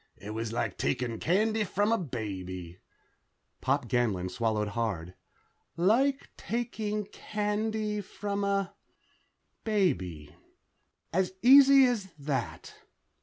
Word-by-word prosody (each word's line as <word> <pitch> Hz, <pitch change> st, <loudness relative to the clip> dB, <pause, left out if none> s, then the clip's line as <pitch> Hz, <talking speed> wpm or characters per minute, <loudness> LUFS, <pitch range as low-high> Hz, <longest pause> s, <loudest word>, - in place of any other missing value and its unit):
It 105 Hz, -, -8 dB
was 110 Hz, 0 st, -3 dB
like 115 Hz, -, -2 dB
taking 115 Hz, -, -1 dB
candy 215 Hz, +5 st, +2 dB
from 205 Hz, +2 st, 0 dB
a 230 Hz, -, +3 dB
baby...." 95 Hz, -, -6 dB, 0.8 s
Pop 135 Hz, -1 st, 0 dB
Ganlon 105 Hz, -6 st, 0 dB
swallowed 110 Hz, 0 st, 0 dB
hard. 100 Hz, -6 st, -3 dB, 0.6 s
"Like 260 Hz, +10 st, +2 dB
taking 220 Hz, -3 st, -3 dB
candy 210 Hz, +1 st, -2 dB
from 200 Hz, +1 st, -4 dB
a... 200 Hz, -1 st, 0 dB, 0.9 s
baby. 95 Hz, -, -1 dB, 0.8 s
As 185 Hz, +1 st, +1 dB
easy 275 Hz, +1 st, +8 dB
as 235 Hz, -6 st, 0 dB
that...." 140 Hz, -1 st, -4 dB
185 Hz, 100 wpm, -29 LUFS, -, 0.9 s, easy